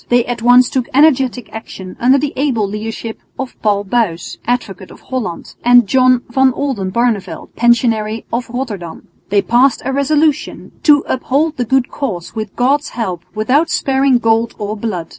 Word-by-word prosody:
They 245 -1 +3
at 240 -2 -4
once 245 +1 +6
took 255 -2 -1
energetic 265 -5 +2
action 190 -4 -8
under 255 +3 +4
the 290 +1 -2
able 255 -7 0
leadership 220 +2 -6 0.2
of 265 -1 -5
Paul 205 -2 +1
Buys, 195 -5 -2
Advocate 200 -7 -3
of - - -14
Holland, 235 -10 -5
and 245 -1 +6
John 255 +1 +3
van 260 +1 +2
Oldenbarneveldt, 235 -4 -2
Pensionary 225 -2 +1
of 240 +1 -2
Rotterdam. 215 -9 -6 0.2
They 200 0 +2
passed 250 +2 +2
a 270 - -1
resolution 295 +2 0
"to 295 -2 +5
uphold 290 +5 0
the 245 - -1
good 265 +1 +1
cause 185 - -4
with 215 -3 -6
God's 280 +5 +1
help 185 -7 -3
without 260 +10 +1
sparing 270 -1 +2
gold 225 0 +1
or 210 0 -4
blood." 200 -7 -4
240 Hz, 160 wpm, -16 LUFS, 215-265 Hz, 0.2 s, once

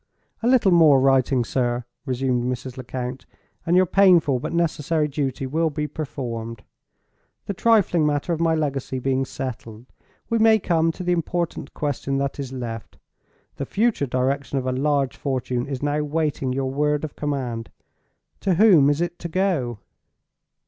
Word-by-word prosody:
"A 230 - 0
little 245 -6 +4
more 160 -5 +6
writing, 130 -2 +3
sir," 120 -1 -1 0.2
resumed 130 -1 0
Mrs. 125 0 -4
Lecount, 130 0 -6 0.4
"and 170 - +3
your 185 - +5
painful 175 -8 +4
but - - -4
necessary 160 -2 0
duty 135 -2 -3
will 160 +5 0
be 150 0 -3
performed. 120 -7 -5 0.8
The 200 - -3
trifling 200 -6 +3
matter 145 +3 0
of 160 - -3
my 165 -1 +3
legacy 140 -4 -2
being 135 +1 0
settled, 120 -4 -7 0.4
we 230 - 0
may 220 0 +6
come 165 -4 +1
to 185 - -7
the 180 - 0
important 170 0 -2
question 140 -2 -2
that 140 +1 -2
is 135 -2 -5
left. 120 -4 -6 0.6
The 140 - -3
future 215 -9 +1
direction 135 +3 -1
of 130 - -2
a 130 - 0
large 140 0 0
fortune 130 -2 -2
is 135 -1 -5
now 145 +1 0
waiting 150 -3 -1
your 130 0 -2
word 150 +1 0
of 155 - -5
command. 130 -6 -3 0.7
To 190 -3 +1
whom 175 -8 +6
is 145 +3 +1
it 175 0 -3
to 170 - -5
go?" 160 - 0
140 Hz, 160 wpm, -23 LUFS, 130-165 Hz, 0.8 s, more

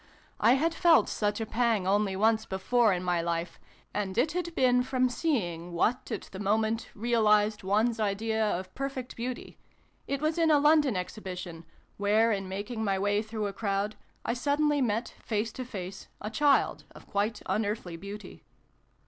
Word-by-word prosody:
(I 230 +3 +5
had 320 +5 +1
felt 335 -1 +5
such 205 0 -1
a 225 - -2
pang 225 -3 +1
only 200 0 +2
once 220 +2 +2
before 220 +4 +2
in 180 -1 -1
my 175 -1 +1
life, 170 0 -3 0.3
and 200 -1 -3
it 275 +6 +3
had 345 0 -3
been 250 -1 +4
from 255 0 +1
seeing 175 - -2
what, 230 +9 0
at - - -2
the 190 - -8
moment, 220 +3 0
realised 215 -2 +2
one's 215 +4 +1
idea 220 +2 0
of 185 -3 -2
perfect 270 -2 -5
beauty 245 +1 -6 0.5
it 275 - -1
was 310 +3 0
in 325 -1 +4
a 300 - +6
London 295 -6 +4
exhibition, 180 -3 -6 0.3
where, 215 +3 +3
in 195 -3 -2
making 205 +4 -4
my 195 -2 +1
way 205 +2 +1
through 220 -1 -4
a 200 - -3
crowd, 200 0 -1 0.3
I - - 0
suddenly 290 +3 +1
met, 230 -1 -1
face 220 0 -1
to 255 - -6
face, 190 -5 -7
a 210 - -5
child 285 +5 +2
of - - -13
quite 205 +2 -1
unearthly 205 -5 -2
beauty.) 200 +4 -9
215 Hz, 170 wpm, -29 LUFS, 195-250 Hz, 0.5 s, a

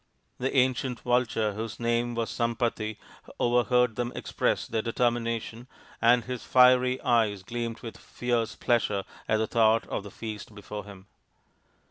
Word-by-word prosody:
The 130 +2 -1
ancient 130 -1 +1
vulture 120 -3 +1
whose 110 +1 -5
name 120 0 0
was 115 -1 -2
Sampati 115 -2 -1 0.4
overheard 125 -1 +2
them 120 0 -1
express - - -1
their 110 -1 -1
determination, 115 0 -1 0.3
and 120 +1 +5
his 125 -2 -5
fiery 125 0 +5
eyes 110 -5 +2
gleamed 115 +2 -4
with 115 - -8
fierce 120 -2 -2
pleasure 105 -5 +1 0.3
at 110 - +3
the 110 - +1
thought 110 0 +3
of - - -2
the 100 - -9
feast 110 0 -8
before 105 0 -7
him. 100 -2 -12
115 Hz, 140 wpm, -28 LUFS, 110-125 Hz, 0.4 s, and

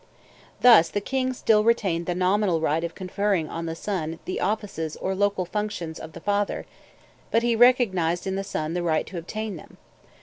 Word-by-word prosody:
Thus 230 -10 +7
the 205 - -1
king 260 +4 -1
still 220 -4 +2
retained 195 -7 +1
the 175 - -1
nominal 185 -1 +2
right 160 +1 0
of 170 -1 -4
conferring 190 -2 -1
on 165 0 -5
the 165 - -3
son 165 -4 -3
the 185 - -3
offices 195 -6 -2
or 190 - -2
local 200 -1 0
functions 195 -4 -4
of 160 - -9
the - - -9
father, 205 +1 -1 0.6
but 230 - +2
he 235 -1 +2
recognized 205 -9 +3
in 190 - -2
the 195 - -2
son 160 -5 -3
the 175 - -1
right 160 -2 +1
to 180 - -6
obtain 215 +3 -5
them. - - -15
190 Hz, 190 wpm, -25 LUFS, 165-210 Hz, 0.6 s, Thus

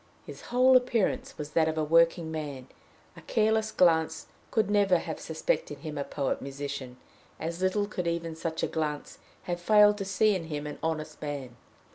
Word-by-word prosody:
His - - -10
whole 255 +1 +5
appearance 250 -5 +1
was 150 0 -6
that 160 +1 +3
of 160 0 -2
a 155 - +1
workman; 160 -4 +1 0.5
a - - -12
careless 220 0 +1
glance 160 -2 +2 0.2
could 220 -3 +1
never 200 -3 +3
have - - -5
suspected - - -2
him 155 -2 -6
a 140 - -2
poet 140 -1 -2
musician; 140 -2 -6 0.4
as 165 +2 -4
little 190 +2 +1
could 180 -4 -4
even 170 -1 -2
such 160 0 -4
a - - +2
glance 150 -2 -4 0.2
have 175 -1 -4
failed 210 +2 +5
to 195 - -3
see 205 +3 +3
in 180 -4 -3
him 150 -2 -5
an 150 - -6
honest 155 -1 -3
man. 140 -5 -5
165 Hz, 175 wpm, -28 LUFS, 150-205 Hz, 0.5 s, whole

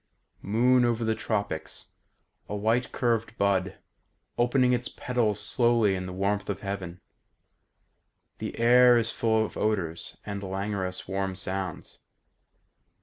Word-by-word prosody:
"Moon 125 +5 +3
over 120 -1 +1
the 110 0 +1
tropics, 100 -8 -3 0.6
A 105 - -3
white 115 +4 0
curved 115 -2 -1
bud 95 -1 +1 0.6
Opening 125 +1 +3
its 125 +1 -1
petals 120 -5 -1
slowly 115 -1 +2
in 90 -1 -3
the - - -6
warmth 100 +3 -1
of 95 -1 -3
heaven.... 95 -3 -5 1.4
The - - -5
air 125 +1 +6
is 115 0 +1
full 110 -1 +1
of - - -9
odours 95 -6 -2
And 100 -1 -4
languorous 95 -1 -3
warm 95 0 -2
sounds.... 95 -1 -5
105 Hz, 125 wpm, -27 LUFS, 95-120 Hz, 1.4 s, air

